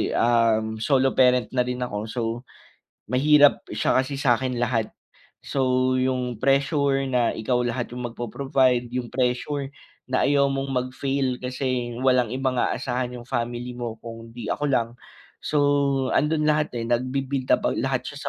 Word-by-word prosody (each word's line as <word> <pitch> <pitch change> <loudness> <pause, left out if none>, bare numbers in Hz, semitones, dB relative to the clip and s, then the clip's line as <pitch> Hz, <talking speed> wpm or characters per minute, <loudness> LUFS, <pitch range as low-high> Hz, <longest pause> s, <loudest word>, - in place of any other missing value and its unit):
um, 110 -2 +2
solo 135 +2 +2
parent 125 -2 +3
na 125 -1 0
rin 125 0 -2
ako 105 -4 -4
so 120 +2 -4 0.9
mahirap 145 +4 +5
siya 105 - 0
kasi 135 +1 -5
sakin 125 -1 +1
lahat. 120 -2 0 0.5
So 130 -1 +1
yung 125 -3 -2
pressure 140 0 +2
na 125 -3 +1
ikaw 125 +2 0
lahat 120 0 -3
yung 125 -1 -4
magpo-provide 125 +1 0
yung 125 -1 -4
pressure 135 +2 -1 0.4
na 130 - +2
ayaw 140 -1 +3
mong 135 0 -2
mag-fail 130 0 -1
kasi 125 -1 -3
walang 125 -3 +2
ibang 130 -1 -1
aasahan 125 0 -1
yung 120 0 -10
family 120 0 -3
mo 120 -2 -4
kung 115 0 -10
di 120 - -5
ako - - -2
lang, 120 -4 +1 0.6
so 150 - 0 0.6
andun 150 0 +2
lahat, 150 -2 +1
eh, 115 - -3
nagbi-build 130 +2 -1
up - - +3
ang - - -2
lahat - - 0
siya - - -9
125 Hz, 150 wpm, -24 LUFS, 120-135 Hz, 0.9 s, mahirap